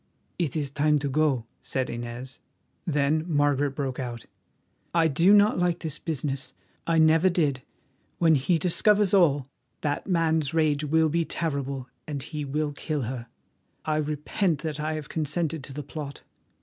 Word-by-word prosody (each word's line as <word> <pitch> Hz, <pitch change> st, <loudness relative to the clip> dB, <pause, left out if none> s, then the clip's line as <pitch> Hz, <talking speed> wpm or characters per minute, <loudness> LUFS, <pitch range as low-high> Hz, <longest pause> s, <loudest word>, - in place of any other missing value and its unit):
"It 165 Hz, -7 st, -1 dB
is 145 Hz, -3 st, -1 dB
time 150 Hz, +1 st, +3 dB
to 145 Hz, 0 st, -2 dB
go," 140 Hz, -4 st, +1 dB, 0.2 s
said 130 Hz, -1 st, -2 dB
Inez. 120 Hz, +2 st, -6 dB, 0.5 s
Then 150 Hz, 0 st, +2 dB
Margaret 145 Hz, -3 st, +2 dB
broke 135 Hz, -2 st, -3 dB
out: 120 Hz, -3 st, -5 dB, 0.7 s
"I 165 Hz, -1 st, +5 dB
do 165 Hz, +6 st, +4 dB
not 205 Hz, -1 st, +5 dB
like 175 Hz, -1 st, +1 dB
this 155 Hz, -3 st, -4 dB
business; 140 Hz, -3 st, -3 dB, 0.3 s
I 165 Hz, -1 st, +2 dB
never 160 Hz, +3 st, +5 dB
did. 150 Hz, -7 st, +1 dB, 0.6 s
When 165 Hz, -2 st, +4 dB
he 155 Hz, +5 st, +2 dB
discovers 200 Hz, +4 st, +3 dB
all, 145 Hz, -8 st, +4 dB, 0.4 s
that 145 Hz, -1 st, -2 dB
man's 160 Hz, -4 st, +1 dB
rage 155 Hz, -2 st, +2 dB
will 160 Hz, +1 st, +3 dB
be 170 Hz, +2 st, +1 dB
terrible, 140 Hz, -5 st, -3 dB, 0.2 s
and 145 Hz, -3 st, -4 dB
he 150 Hz, 0 st, -5 dB
will 145 Hz, +1 st, -2 dB
kill 150 Hz, -1 st, -3 dB
her. 120 Hz, 0 st, -5 dB, 0.6 s
I 155 Hz, -1 st, +1 dB
repent 150 Hz, +2 st, -1 dB
that 155 Hz, -2 st, -3 dB
I 155 Hz, +1 st, -1 dB
have 155 Hz, -2 st, -5 dB
consented 160 Hz, 0 st, -2 dB
to -, -, -9 dB
the 150 Hz, +2 st, -5 dB
plot." 145 Hz, -1 st, -7 dB
150 Hz, 160 wpm, -26 LUFS, 140-165 Hz, 0.7 s, I